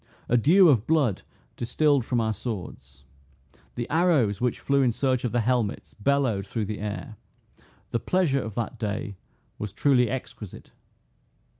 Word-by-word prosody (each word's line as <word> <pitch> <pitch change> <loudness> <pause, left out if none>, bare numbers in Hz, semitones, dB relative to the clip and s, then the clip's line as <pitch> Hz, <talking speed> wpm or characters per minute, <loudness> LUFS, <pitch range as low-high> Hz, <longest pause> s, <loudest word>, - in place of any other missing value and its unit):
A 120 - +2
dew 170 - +6
of 125 -8 +3
blood 145 - +2 0.3
distilled 140 +2 +1
from 120 -1 0
our 110 -1 0
swords. 90 - -7 0.7
The 120 - -3
arrows 150 - +2
which 125 -1 0
flew 140 0 +1
in 125 -3 +3
search 130 +1 0
of 125 - -1
the 120 - +1
helmets, 120 -2 -1
bellowed 115 -4 0
through 110 -3 -2
the 105 +1 -5
air. 105 +2 -5 0.7
The 115 - 0
pleasure 160 -6 +1
of 110 -3 -7
that 120 0 -4
day 105 -1 -3 0.4
was 105 -1 -4
truly 125 +2 +3
exquisite. 115 -5 -7
120 Hz, 150 wpm, -26 LUFS, 105-140 Hz, 0.7 s, dew